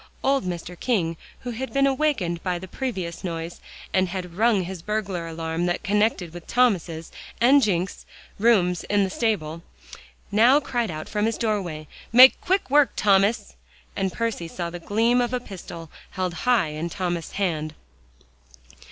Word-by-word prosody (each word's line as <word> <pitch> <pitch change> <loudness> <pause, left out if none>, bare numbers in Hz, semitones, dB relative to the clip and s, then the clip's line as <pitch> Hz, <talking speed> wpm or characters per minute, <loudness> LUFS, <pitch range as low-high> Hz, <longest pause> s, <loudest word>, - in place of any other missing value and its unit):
Old 270 -5 +2
Mr. 180 0 -5
King 180 -10 0 0.3
who 245 - -5
had 260 +3 -5
been 275 0 +3
awakened 265 - 0
by 180 -2 -1
the 190 +2 -8
previous 185 -7 -4
noise, 165 -1 -5 0.3
and 185 -1 +2
had 180 -1 -5
rung 215 0 +2
his 180 -1 -6
burglar 195 -4 -3
alarm 165 +1 -2
that 175 - -1
connected 205 -4 +1
with 175 -1 -10
Thomas's 180 -10 +1 0.3
and 270 +4 +6
Jencks's 190 -5 -1 0.3
rooms 190 -6 +3
in 205 -1 +2
the 190 - -2
stable, 170 -9 -1 0.7
now 235 +7 +6
cried 240 -6 -2
out 155 -1 -6
from 210 +1 0
his 225 - -1
doorway. 185 -9 -2 0.2
"Make 255 +3 +8
quick 370 -7 0
work, 290 -5 +5
Thomas," 200 - +2 0.4
and 190 -1 -1
Percy 230 -7 -2
saw 170 +1 -5
the 175 - -6
gleam 230 +7 +2
of 240 0 -1
a - - -1
pistol 175 -7 -9 0.2
held 185 -2 -3 0.2
high 235 -10 +4
in 155 +3 -4
Thomas's 175 -3 -3
hand. 160 -6 -2
190 Hz, 160 wpm, -24 LUFS, 170-230 Hz, 0.7 s, Make